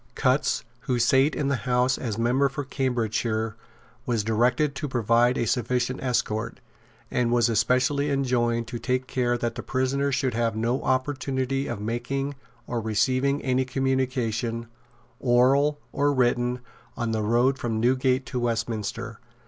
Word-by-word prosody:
Cutts, - - +1 0.2
who 125 0 -1
sate 130 +5 +3
in 145 - -1
the 140 -1 +1
House 125 +1 +3
as 110 -5 -3
member 125 +4 +2
for 145 +1 -4
Cambridgeshire, 115 -4 -1 0.5
was 115 -4 +1
directed 125 +6 +2
to 145 +1 -4
provide 120 0 +2
a 120 - 0
sufficient 125 +2 0
escort, 115 -3 -1 0.5
and 120 -1 +1
was 120 -1 +3
especially 130 +6 +2
enjoined 120 -4 +1
to 120 -2 -5
take 125 +2 -1
care 120 -2 0
that 120 -1 -2
the 120 - -6
prisoner 135 +2 0
should 130 -2 0
have 115 -1 0
no 115 +4 0
opportunity 130 0 -1
of - - -4
making 125 +6 -2 0.3
or 120 -1 -3
receiving 130 +6 +1
any 130 0 +1
communication, 125 -3 -1 0.5
oral 135 +4 +3
or 145 +1 +2
written, 125 -1 +1 0.4
on 115 -1 -1
the 110 -1 0
road 120 +5 +2
from 115 -2 -2
Newgate 130 +2 +2
to 125 - -3
Westminster. 115 -1 -3
125 Hz, 145 wpm, -25 LUFS, 115-130 Hz, 0.5 s, sate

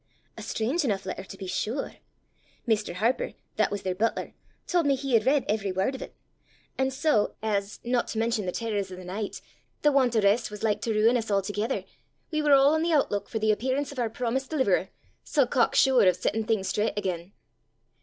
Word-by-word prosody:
A - - -9
strange 260 +10 -1
enough 200 -7 -1
letter 190 0 -5
to 195 - -11
be 195 - -7
sure! 220 +8 -3 0.7
Mr. 210 -5 0
Harper, 240 - 0 0.2
that - - +3
was 205 -1 -4
their 185 - -1
butler, 220 +5 -1 0.3
told 345 -4 +1
me 275 - +4
he 270 -1 -3
had 225 0 +3
read 280 -1 +3
every 205 -2 0
word 190 +8 0
of 265 - -7
it! - - -8 0.6
And 265 0 0
so, 265 -5 +1
as, 205 -1 -1
not 240 0 0
to - - -5
mention 225 -3 0
the - - 0
terrors 205 -3 -2
o' - - -6
the 180 0 -10
nicht, 200 +3 -5 0.4
the 295 - +5
want 260 -4 +3
o' - - +5
rist 200 +4 +3
was 210 0 -9
like 210 -1 +1
to 230 - -1
ruin 220 +3 +4
us 225 -2 -4
a'thegither, 205 +4 -1 0.5
we 310 -1 0
were 300 - +1
a' 275 - +8
on 295 +4 +4
the 335 0 +1
outlook 205 -9 +1
for 225 - -3
the 215 0 +2
appearance 260 +6 -1
of 280 - -7
oor 235 -2 0
promised 250 +3 -2
deliverer, 200 - +1 0.3
sae 285 -4 +2
cock 245 -1 +1
sure 265 -2 +5
o' - - +8
settin' 215 +5 -1
things 215 -4 0
straucht 210 0 0
again! 185 -2 -3
225 Hz, 215 wpm, -27 LUFS, 200-265 Hz, 0.7 s, a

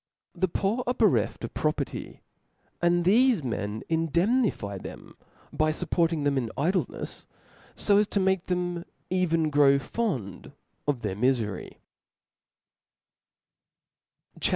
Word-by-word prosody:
The 185 +1 0
poor 200 +8 -1
are 250 - +1
bereft - - +2
of - - -5
proper - - 0
ty; - - -9 0.6
and 175 0 +3
thefe 230 - +4
men 110 -3 -3
indemnify 165 - +1
them - - -10 0.4
by 155 0 +2
fupporting 165 -1 0
them 140 -1 +2
in 120 -3 -3
idlenefs, 180 +7 -2 0.5
fo 200 -1 +3
as 210 - +2
to 205 - 0
make 190 -2 +1
them 175 -1 -1 0.3
even 165 -4 +1
grow 140 -1 +5
fond 135 - -3 0.3
of 140 -5 0
their 95 - -2
mifery. 115 -4 -1
165 Hz, 115 wpm, -27 LUFS, 135-190 Hz, 0.6 s, grow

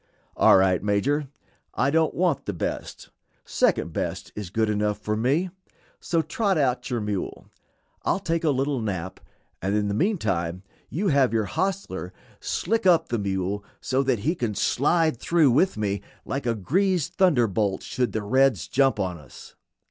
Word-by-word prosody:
"All - - +6
right, 95 -1 +3
Major, 130 +9 0 0.5
I 135 - +2
don't 160 0 +2
want 180 -1 0
the 100 - -1
best; 85 - -5 0.3
second - - +1
best - - -3
is 105 -4 -5
good 110 +4 0
enough 105 0 0
for 105 0 -2
me; 140 +11 +1 0.5
so 165 -2 0
trot 190 +4 0
out 130 -4 0
your 120 -2 -1
mule. 105 -3 -4 0.6
I'll - - +1
take 165 -3 -1
a 160 - +3
little 135 -1 0
nap, 95 -3 -4 0.4
and 95 +2 0
in 105 -1 0
the - - -1
meantime 100 - -1 0.3
have 140 - +2
your 110 -2 +1
hostler 195 - -3 0.3
slick 225 -3 -1
up 175 -3 +4
the 120 - -1
mule 100 0 -2 0.2
so 130 +1 0
that 130 -6 0
he 160 - +3
can 120 - -3
slide 155 - +2
through 160 -2 +3
with 155 - +2
me 100 -2 -1 0.2
like 135 -2 -3
a 115 - +1
greased 175 - 0
thunderbolt 115 - +2
should 125 -4 -1
the 110 0 -3
reds 130 -2 +2
jump 135 -4 +2
on 90 -4 -2
us." 70 -4 -14
125 Hz, 165 wpm, -25 LUFS, 100-160 Hz, 0.6 s, All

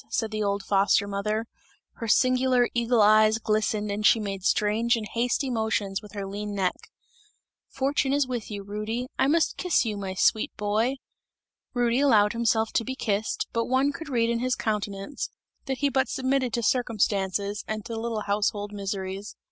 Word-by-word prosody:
said 225 -2 -1
the 215 0 -2
old 200 -1 0
foster 200 0 +3
mother, 210 +3 -2 0.5
her 230 - -5
singular 255 +1 +3
eagle 235 -1 +3
eyes 215 +1 +5
glistened 215 -1 0
and 205 +1 -3
she 225 - +5
made 195 -2 -4
strange 215 +5 +2
and 220 -2 -4
hasty 245 +4 0
motions 220 -5 -1
with 210 -2 -13
her 200 -2 -4
lean 205 +1 -5
neck. 190 -2 +1 0.9
"Fortune 270 0 0
is 285 0 +2
with 245 -4 -4
you, 205 -2 -5
Rudy, 215 +4 -3
I 265 - +4
must 325 +3 +2
kiss 360 -8 +2
you, 215 -2 -2
my 190 -2 -4
sweet 215 +3 +2
boy!" 215 +5 0 0.8
Rudy 240 0 +2
allowed 220 -7 +4
himself 225 -1 +1
to - - +2
be 260 +3 -4
kissed, 215 -3 -1
but 230 0 0
one 265 +3 +2
could 310 +2 -8
read 235 -3 +1
in 235 - 0
his 255 +1 0
countenance, 210 +3 -3 0.4
that 265 -1 -1
he 285 0 +1
but 265 0 +1
submitted 260 -1 0
to 235 - -1
circumstances 205 -4 0
and 215 -1 -4
to 230 - -5
little 225 -1 -3
household 205 0 -1
miseries. 195 0 -5
220 Hz, 175 wpm, -26 LUFS, 205-245 Hz, 0.9 s, eyes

